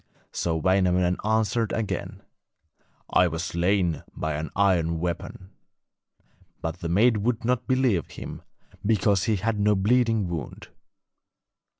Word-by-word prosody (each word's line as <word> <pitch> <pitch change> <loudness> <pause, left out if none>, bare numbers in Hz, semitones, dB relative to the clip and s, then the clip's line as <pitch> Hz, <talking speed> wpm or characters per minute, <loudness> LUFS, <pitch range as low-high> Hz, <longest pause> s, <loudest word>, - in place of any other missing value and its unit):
So 85 -1 -1
Wainamoinen 90 +1 +2
answered 110 +1 +1
again: 110 -3 -3 0.9
'I 90 - +5
was 80 +1 -3
slain 85 0 0
by 80 0 -2
an 75 +1 -4
iron 85 -5 +2
weapon.' 90 +2 -5 1.1
But 80 +1 -4
the 85 - -4
maid 110 +6 +4
would 115 +2 -1
not 125 0 0
believe 130 - +1
him, - - -8 0.4
because 100 -2 +2
he 110 - +2
had 105 +2 -1
no 105 0 +3
bleeding 110 0 +2
wound. 85 -6 -6
95 Hz, 120 wpm, -25 LUFS, 85-110 Hz, 1.1 s, I